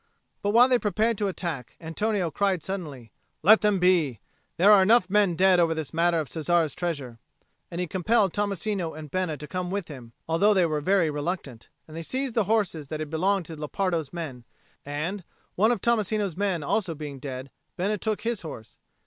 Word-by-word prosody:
But 205 - 0
while 235 +4 +6
they 250 -2 +3
prepared 215 +2 0
to 205 - +1
attack, 170 -9 -5
Antonio 180 +2 -1
cried 190 0 0
suddenly, 150 - -6 0.3
"Let 215 +6 +7
them 210 -2 +3
be! 175 - +2 0.4
There 195 +5 +6
are 205 -2 +8
enough 195 -1 +4
men 205 -4 +3
dead 185 0 +4
over 165 -1 +3
this 160 -2 -5
matter 170 0 +2
of 155 - -3
Cesare's 165 0 0
treasure." 140 -9 -4 0.5
And 170 - -6
he 180 - 0
compelled 195 +2 +1
Tommasino 200 -4 -2
and 150 -3 -9
Bena 185 -5 -1
to 150 - -9
come 180 +3 -3
with 195 -2 -3
him, 125 -5 -10
although 200 +6 +3
they 185 -2 +4
were 155 -2 -1
very 180 -1 +2
reluctant; 145 -6 -4 0.2
and 155 - -11
they 165 - -4
seized 260 - -3
horses 205 - 0
that 155 +2 -5
had 155 -1 -5
belonged 185 +3 +1
to 165 - -8
Lepardo's 160 0 -2
men; 155 -8 -6 0.4
and, 160 +7 -4 0.3
one 215 +5 +3
of 230 -6 -1
Tommasino's 215 -5 0
men 190 -5 -1
also 180 +2 -1
being 145 -2 -7
dead, 130 0 -7 0.3
Bena 205 +3 -1
took 215 +1 -2
his 230 -1 -2
horse. 120 -9 -10
175 Hz, 190 wpm, -26 LUFS, 155-200 Hz, 0.5 s, are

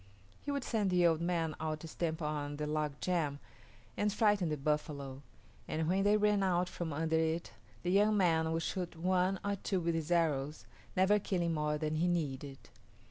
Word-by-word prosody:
He - - -7
would 280 -2 -1
send 215 -5 0
the 180 -1 +3
old 165 -1 +3
man 170 -2 0
out 155 -1 -3
to 165 - -7
stamp 160 0 -3
on 145 -1 -2
the 150 - -2
log 150 -1 -2
jam 165 -6 0 0.6
and 210 0 +1
frighten 205 -5 +2
the 150 - -1
buffalo, 140 -2 -2 0.5
and 155 0 -1
when 190 +3 +2
they 205 +1 +4
ran 210 -1 +3
out 180 -2 +2
from 170 -2 -4
under 160 +2 +1
it 160 +1 -1 0.3
the 175 - 0
young 210 +2 +4
man 160 -4 +3
would 165 0 -1
shoot 180 -1 -3
one 185 +2 +1
or 200 0 0
two 195 0 -1
with 170 -1 0
his 165 -1 -2
arrows, 155 -4 +1 0.3
never 195 +3 +5
killing 175 -4 -1
more 150 -1 0
than 155 0 -1
he 170 +3 +2
needed. 145 -5 -2
165 Hz, 190 wpm, -33 LUFS, 155-185 Hz, 0.6 s, never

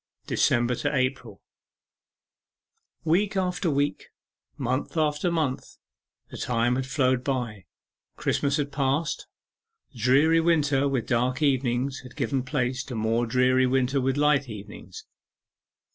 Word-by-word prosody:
DECEMBER 120 +1 +2
TO 145 +4 -1
APRIL 130 -6 -2 1.6
Week 195 +6 +1
after 180 -2 0
week, 145 0 -1 0.5
month 130 +5 -2
after 150 +2 +1
month, 155 -6 -2 0.5
the - - -7
time 120 0 +1
had 130 0 -2
flown 130 -2 +1
by. 120 -8 -3 0.5
Christmas 140 -1 0
had 145 -1 -2
passed; 140 +3 -1 0.7
dreary 135 +8 +4
winter 150 -4 +2
with 130 -5 -1
dark 125 +4 0
evenings 130 -1 0
had 125 0 -13
given 135 -1 -1
place 130 -1 -2
to 125 - -6
more 115 +2 0
dreary 130 +1 +3
winter 130 +1 +1
with 130 +2 0
light 145 -3 +2
evenings. 105 -1 -10
130 Hz, 120 wpm, -26 LUFS, 125-145 Hz, 1.6 s, dreary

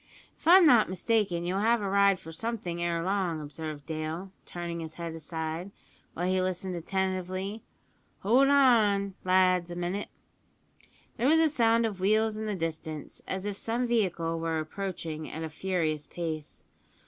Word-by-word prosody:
"If - - -11
I'm 360 +1 +9
not 240 - +6
mistaken 185 -2 0
you'll 185 +2 0
have 230 +3 +3
a 205 - -2
ride 200 -1 +4
for 160 - -10
something 180 -2 -4
ere 170 -1 0
long," 185 -3 0
observed 150 -1 -7
Dale, 160 +4 -4 0.2
turning 170 -1 -5
his 160 -1 -7
head 170 -1 -5
aside, 160 +2 -5 0.5
while 175 - -2
he 185 0 +2
listened 185 0 -2
attentively. 190 +3 -2 0.6
"Hold 250 +7 +4
on, 220 -8 +4
lads, 185 -1 +3
a 175 - -6
minute!" 180 +4 -3 1.1
There 245 +2 +1
was 320 +3 +5
a 325 - +5
sound 230 -4 +3
of 205 -4 -3
wheels 215 +3 +2
in 215 0 -4
the 210 - -1
distance, 160 -3 -5
as 190 +1 -3
if 205 -1 -4
some 235 +2 -1
vehicle 175 -8 0
were 165 0 -1
approaching 160 -1 -4
at 160 - -5
a 160 - -4
furious 155 -3 -2
pace. 160 -3 -5
185 Hz, 160 wpm, -29 LUFS, 165-210 Hz, 1.1 s, I'm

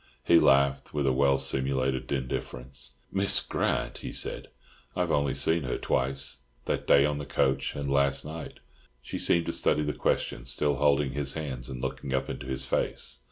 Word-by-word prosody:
He 85 +4 +6
laughed 70 +1 +3
with 70 -1 +1
a 65 - +3
well 70 +1 +3
simulated 65 -1 0
indifference. 65 -1 -4 0.2
"Miss 100 +1 +3
Grant!" - - -1
he - - -6
said, - - -2 0.5
"I - - 0
have - - 0
only 70 -2 +1
seen 80 +1 +2
her 65 -3 -2
twice—that 65 -2 -2
day 70 0 +6
on 75 0 -1
the 75 - -5
coach 65 0 0
and 70 -1 -3
last 70 0 +2
night." 80 +1 -8 0.4
She - - -5
seemed 85 -1 +2
to - - -2
study 75 - +1
the 75 0 -1
question, 65 - -1
still 70 +2 +1
holding 70 -1 +3
his 70 0 -2
hands, 65 -6 -4
and 65 -2 -6
looking 65 -1 -3
up 65 0 -1
into - - -7
his 65 0 -3
face. 65 - -2
70 Hz, 180 wpm, -28 LUFS, 65-70 Hz, 0.5 s, He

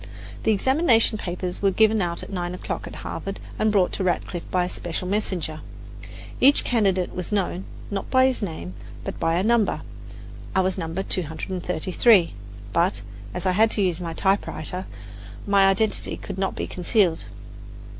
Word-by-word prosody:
The 220 - +2
examination 230 - +3
papers 180 -1 -4
were 200 - +4
given 220 +2 +3
out 170 -1 -2
at - - -9
nine 175 -1 -2
o'clock - - -5
at - - -8
Harvard 195 0 -5 0.2
and 215 0 +3
brought 195 -3 +3
to 195 - -2
Radcliffe 175 -1 -2
by 180 -1 +1
a - - -3
special 175 +1 -4
messenger. 180 -6 -2 0.8
Each 280 +3 +5
candidate 195 -6 +1
was 180 +2 -5
known, 190 -2 -1 0.3
not 195 -1 -3
by 260 0 +5
his 260 -2 +1
name, 160 - -5 0.3
but - - -5
by 165 0 +1
a 180 - +1
number. 225 -1 +2 0.7
I 190 - +5
was 185 0 0
No. 165 0 -4
233, 180 +2 +1 0.4
but, 170 - +1 0.3
as - - -4
I 185 - +3
had 220 +4 +4
to 210 - +1
use 180 -2 +1
a 165 -1 -4
typewriter, 190 -2 0 0.6
my 200 -1 +5
identity 205 +3 0
could 195 -1 -7
not 195 - -1
be - - -2
concealed. 180 -2 +1
190 Hz, 165 wpm, -24 LUFS, 175-210 Hz, 0.8 s, Each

